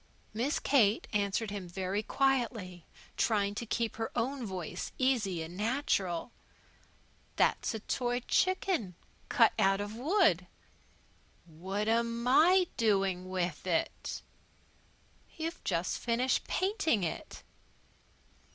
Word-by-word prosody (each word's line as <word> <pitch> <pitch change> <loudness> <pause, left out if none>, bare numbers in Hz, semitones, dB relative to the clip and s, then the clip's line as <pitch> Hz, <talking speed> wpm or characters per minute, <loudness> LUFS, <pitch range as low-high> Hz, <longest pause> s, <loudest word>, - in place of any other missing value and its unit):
Miss 245 +7 0
Kate 225 -6 +3
answered 200 +1 0
him 195 -4 -6
very 190 +3 -2
quietly, 230 - -1 0.3
trying 205 -3 +1
to 230 +3 -5
keep 230 +1 -1
her 225 0 -2
own 265 +2 -1
voice 185 -4 -5
easy 215 -10 +1
and 165 +2 -9
natural. 210 - -1 1.0
"That's - - +1
a 220 - -5
toy 245 +2 -1
chicken, 365 - +1 0.3
cut - - +5
out 195 0 +3
of 205 +1 -4
wood." 255 - +2 1.0
"What'm 215 +8 -1
I 355 +8 +6
doin' 195 -4 +1
with 180 -2 -2
it?" 170 -3 -2 1.1
"You've 330 +1 -4
just - - -1
finished 245 +2 0
painting 370 - +1
it." 165 - -5
215 Hz, 105 wpm, -31 LUFS, 190-255 Hz, 1.1 s, I